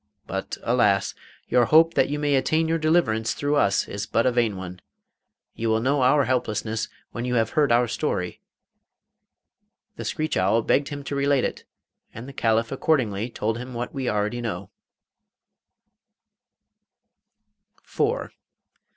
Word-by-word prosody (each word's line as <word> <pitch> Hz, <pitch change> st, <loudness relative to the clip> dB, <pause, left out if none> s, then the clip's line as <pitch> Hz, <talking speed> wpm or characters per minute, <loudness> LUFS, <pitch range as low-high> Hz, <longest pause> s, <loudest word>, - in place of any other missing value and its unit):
But, -, -, -4 dB
alas! 105 Hz, -5 st, +2 dB, 0.3 s
your 125 Hz, -1 st, +3 dB
hope 165 Hz, +5 st, +5 dB
that -, -, +2 dB
you 145 Hz, -, -2 dB
may 145 Hz, -1 st, 0 dB
attain 155 Hz, +4 st, +2 dB
your 165 Hz, 0 st, 0 dB
deliverance 155 Hz, -9 st, +1 dB
through 145 Hz, +1 st, 0 dB
us 100 Hz, -8 st, +2 dB
is 100 Hz, 0 st, -5 dB
but 115 Hz, -, +1 dB
a 130 Hz, -, +4 dB
vain 115 Hz, -5 st, +1 dB
one. 90 Hz, -1 st, -8 dB, 0.7 s
You 115 Hz, 0 st, -2 dB
will 110 Hz, 0 st, +2 dB
know 135 Hz, +4 st, +1 dB
our 140 Hz, +3 st, +4 dB
helplessness 110 Hz, -3 st, -1 dB, 0.2 s
when 120 Hz, -, -5 dB
you 125 Hz, 0 st, -1 dB
have 115 Hz, -1 st, +1 dB
heard 145 Hz, -4 st, +2 dB
our 120 Hz, +1 st, +4 dB
story.' 90 Hz, -, -3 dB, 1.6 s
The -, -, -5 dB
screech 155 Hz, 0 st, -2 dB
owl 105 Hz, +5 st, +2 dB
begged 140 Hz, +5 st, +2 dB
him 145 Hz, -1 st, -6 dB
to 140 Hz, -, -4 dB
relate 140 Hz, -1 st, +2 dB
it, -, -, -3 dB, 0.5 s
and 115 Hz, +3 st, -8 dB
the 140 Hz, -, -9 dB
Caliph 115 Hz, -2 st, +1 dB
accordingly 125 Hz, -7 st, 0 dB
told 115 Hz, 0 st, -2 dB
him 125 Hz, 0 st, -8 dB
what 120 Hz, +1 st, -4 dB
we 135 Hz, -3 st, -2 dB
already 105 Hz, +3 st, -1 dB
know. 100 Hz, -4 st, -5 dB
120 Hz, 145 wpm, -24 LUFS, 110-140 Hz, 1.6 s, hope